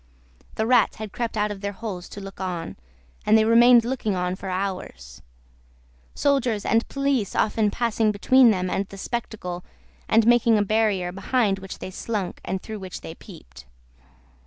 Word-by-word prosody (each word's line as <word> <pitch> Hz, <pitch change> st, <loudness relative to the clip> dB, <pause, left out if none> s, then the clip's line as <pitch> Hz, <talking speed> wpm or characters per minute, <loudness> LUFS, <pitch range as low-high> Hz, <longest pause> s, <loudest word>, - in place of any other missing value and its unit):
The 220 Hz, -, 0 dB
rats 240 Hz, -3 st, +3 dB
had 215 Hz, -2 st, -7 dB
crept 235 Hz, -2 st, -3 dB
out 210 Hz, 0 st, +1 dB
of 200 Hz, -1 st, -7 dB
their 200 Hz, 0 st, -3 dB
holes 190 Hz, -4 st, -6 dB
to -, -, -9 dB
look 195 Hz, 0 st, -10 dB
on, 175 Hz, -3 st, -4 dB, 0.5 s
and 220 Hz, -, +5 dB
they 220 Hz, -, +3 dB
remained 235 Hz, +1 st, +6 dB
looking 235 Hz, -5 st, -1 dB
on 180 Hz, 0 st, -1 dB
for 190 Hz, 0 st, -7 dB
hours; 185 Hz, -, -5 dB, 0.9 s
soldiers 250 Hz, -7 st, +1 dB
and 225 Hz, +1 st, +2 dB
police 275 Hz, -7 st, -1 dB
often 215 Hz, 0 st, +2 dB
passing 225 Hz, -1 st, 0 dB
between 250 Hz, +5 st, +5 dB
them 185 Hz, -4 st, +1 dB
and 195 Hz, +1 st, -2 dB
the 195 Hz, -, -11 dB
spectacle, 190 Hz, -5 st, -5 dB, 0.5 s
and 225 Hz, 0 st, +4 dB
making 235 Hz, -1 st, +4 dB
a 205 Hz, -, +2 dB
barrier 205 Hz, -4 st, +1 dB
behind 195 Hz, +1 st, 0 dB
which 190 Hz, 0 st, -8 dB
they 185 Hz, -, -7 dB
slunk, 200 Hz, -1 st, -4 dB
and 190 Hz, +1 st, -4 dB
through 215 Hz, -1 st, -6 dB
which 185 Hz, -2 st, -8 dB
they 160 Hz, -, -8 dB
peeped. 65 Hz, -, -14 dB
210 Hz, 170 wpm, -24 LUFS, 190-230 Hz, 0.9 s, remained